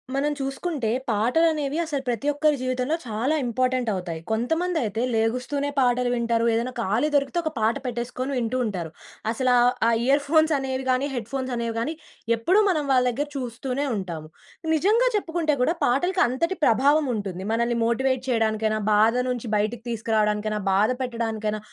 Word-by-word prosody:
మనం 290 Hz, +2 st, +1 dB
చూసుకుంటే 270 Hz, -2 st, -2 dB, 0.2 s
పాటలనేవి 285 Hz, +7 st, +1 dB
అసలు 285 Hz, -4 st, -3 dB
ప్రతి 240 Hz, +4 st, -2 dB
ఒక్కరి 295 Hz, 0 st, +2 dB
జీవితంలో 255 Hz, +3 st, 0 dB
చాలా 235 Hz, +7 st, -1 dB
ఇంపార్టెంట్ 255 Hz, 0 st, 0 dB
అవుతాయి. 180 Hz, -4 st, -4 dB
కొంతమందయితే 245 Hz, -, 0 dB
లేగుస్తూనే 250 Hz, +6 st, 0 dB
పాటలు 250 Hz, -1 st, +2 dB
వింటారు 235 Hz, -1 st, +1 dB
ఏదైనా 235 Hz, +3 st, -1 dB
ఖాళీ 225 Hz, +6 st, +1 dB
దొరికితే 275 Hz, +4 st, +1 dB
ఒక 320 Hz, -, -2 dB
పాట 220 Hz, +1 st, +2 dB
పెట్టేసుకొని 250 Hz, +2 st, -3 dB
వింటూ 240 Hz, +1 st, -1 dB
ఉంటారు. 180 Hz, -7 st, -3 dB, 0.4 s
అసల 255 Hz, +2 st, 0 dB
ఆ, -, -, +4 dB, 0.2 s
ఆ -, -, +5 dB
ఇయర్ 275 Hz, +3 st, +3 dB
ఫోన్స్ 315 Hz, +1 st, +4 dB
అనేవి 265 Hz, -1 st, -3 dB
కాని 255 Hz, +2 st, +1 dB
హెడ్‌ఫోన్స్ 255 Hz, +3 st, -4 dB
అనేవి 235 Hz, -1 st, -2 dB
కాని 280 Hz, +8 st, -2 dB, 0.4 s
ఎప్పుడూ 345 Hz, -, +2 dB
మనం 310 Hz, -6 st, 0 dB
వాళ్ళ 255 Hz, -1 st, +4 dB
దగ్గర 285 Hz, +5 st, -2 dB
చూస్తూనే 255 Hz, +2 st, -3 dB
ఉంటాము. 170 Hz, -6 st, -5 dB, 0.5 s
నిజంగా 435 Hz, +10 st, +3 dB
చెప్పుకుంటే 330 Hz, -6 st, 0 dB
కూడా 320 Hz, -, +2 dB
పాటలకి 355 Hz, +10 st, +1 dB
అంతటి 335 Hz, +10 st, -1 dB
ప్రభావం 285 Hz, +6 st, +4 dB
ఉంటుంది. 190 Hz, -3 st, -4 dB
మనల్ని 235 Hz, +1 st, +1 dB
మోటివేట్ 260 Hz, +2 st, +1 dB
చేయడానికైనా, 220 Hz, -2 st, +1 dB
బాధ 220 Hz, +3 st, +4 dB
నుంచి 245 Hz, -2 st, -3 dB
బయటికి 215 Hz, +2 st, -2 dB
తీసుకురావడానికైనా, 215 Hz, -2 st, 0 dB
బాధ 195 Hz, +2 st, +4 dB
కథ 255 Hz, -, 0 dB
పెట్టడానికైనా, 220 Hz, -3 st, -2 dB
250 Hz, 150 wpm, -24 LUFS, 225-285 Hz, 0.5 s, ఆ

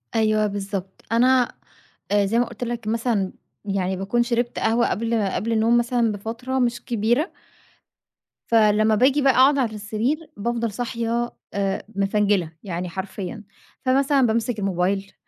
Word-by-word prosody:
أيوه، 215 Hz, -1 st, +3 dB
بالضبط 195 Hz, -2 st, -5 dB
أنا 250 Hz, +2 st, +3 dB, 0.6 s
آآ 205 Hz, -1 st, +3 dB
زي 225 Hz, +4 st, +1 dB
ما 245 Hz, -, +3 dB
قُلت 235 Hz, 0 st, -7 dB
لَك 235 Hz, -2 st, -4 dB
مثلًا، 220 Hz, -4 st, 0 dB, 0.3 s
يعني 190 Hz, -2 st, -1 dB
باكون 200 Hz, +6 st, +1 dB
شِربت 240 Hz, 0 st, -1 dB
قهوة 230 Hz, +2 st, +2 dB
قبل 225 Hz, -2 st, 0 dB
قبل 225 Hz, +4 st, -2 dB
النوم 225 Hz, +2 st, +3 dB
مثلًاً 240 Hz, -1 st, +1 dB
بفترة 230 Hz, +6 st, -3 dB
مش 245 Hz, 0 st, 0 dB
كبيرة، 240 Hz, -, +1 dB, 1.2 s
فلمّا 215 Hz, -1 st, +4 dB
باجي 265 Hz, +6 st, +3 dB
بقى 270 Hz, -1 st, +4 dB
أقعُد 270 Hz, +3 st, +5 dB
على 235 Hz, -5 st, 0 dB
السرير 225 Hz, +10 st, -2 dB
بافضل 230 Hz, +1 st, -1 dB
صاحية 235 Hz, +1 st, -2 dB, 0.2 s
آآ 195 Hz, -1 st, -1 dB
مفنجِلة، 200 Hz, -3 st, +1 dB
يعني 180 Hz, -2 st, -4 dB
حرفيًا 190 Hz, +2 st, -6 dB, 0.4 s
فمثلاً، 275 Hz, +2 st, +3 dB
بامسِك 225 Hz, 0 st, 0 dB
الموبايل 195 Hz, 0 st, -1 dB
225 Hz, 135 wpm, -23 LUFS, 200-240 Hz, 1.2 s, أقعُد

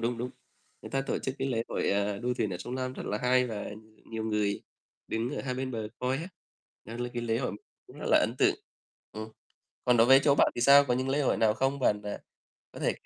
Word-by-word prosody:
đúng, 115 Hz, 0 st, -1 dB
đúng. 125 Hz, +2 st, -3 dB, 0.5 s
Người -, -, -9 dB
ta 135 Hz, -, 0 dB
tổ -, -, 0 dB
chức 130 Hz, -, -3 dB
cái 135 Hz, -, -1 dB
lễ 115 Hz, -3 st, 0 dB
hội, -, -, 0 dB
a, 100 Hz, 0 st, 0 dB
đua 125 Hz, +2 st, -1 dB
thuyền 110 Hz, -4 st, -1 dB
ở 90 Hz, -, -3 dB
sông 120 Hz, +7 st, -6 dB
Lam 130 Hz, 0 st, -2 dB
rất -, -, -7 dB
là 105 Hz, -, -1 dB
hay, 125 Hz, +1 st, +3 dB
và 110 Hz, -4 st, -5 dB, 0.3 s
nhiều 110 Hz, -1 st, -5 dB
người 105 Hz, -2 st, 0 dB, 0.5 s
đứng 115 Hz, +2 st, -1 dB
ở 150 Hz, -, -4 dB
hai 130 Hz, -2 st, -2 dB
bên 130 Hz, 0 st, -3 dB
bờ 110 Hz, -3 st, -4 dB
coi 125 Hz, +1 st, 0 dB
á. 165 Hz, +5 st, -5 dB, 0.6 s
Đó 115 Hz, -, -8 dB
là 120 Hz, 0 st, -2 dB
cái 120 Hz, -, -3 dB
lễ 115 Hz, -1 st, 0 dB
hội 125 Hz, -, -2 dB, 0.3 s
cũng -, -, -14 dB
rất -, -, -5 dB
là -, -, +6 dB
ấn -, -, +1 dB
tượng. -, -, +4 dB, 0.6 s
Ừm. 110 Hz, +1 st, -6 dB, 0.6 s
Còn 125 Hz, -1 st, +4 dB
đối 115 Hz, 0 st, +6 dB
với 135 Hz, +1 st, +8 dB
chỗ 140 Hz, -, +5 dB
bạn -, -, +4 dB
thì -, -, -3 dB
sao? 140 Hz, +3 st, +8 dB
Có 125 Hz, -, +1 dB
những 130 Hz, +1 st, -1 dB
lễ 140 Hz, +2 st, +1 dB
hội 135 Hz, -, +2 dB
nào 110 Hz, -1 st, +3 dB
không? 135 Hz, +4 st, 0 dB
Bạn, 105 Hz, -6 st, +2 dB
à, 105 Hz, 0 st, -5 dB, 0.5 s
có -, -, -10 dB
thể -, -, +2 dB
120 Hz, 255 wpm, -29 LUFS, 110-130 Hz, 0.6 s, với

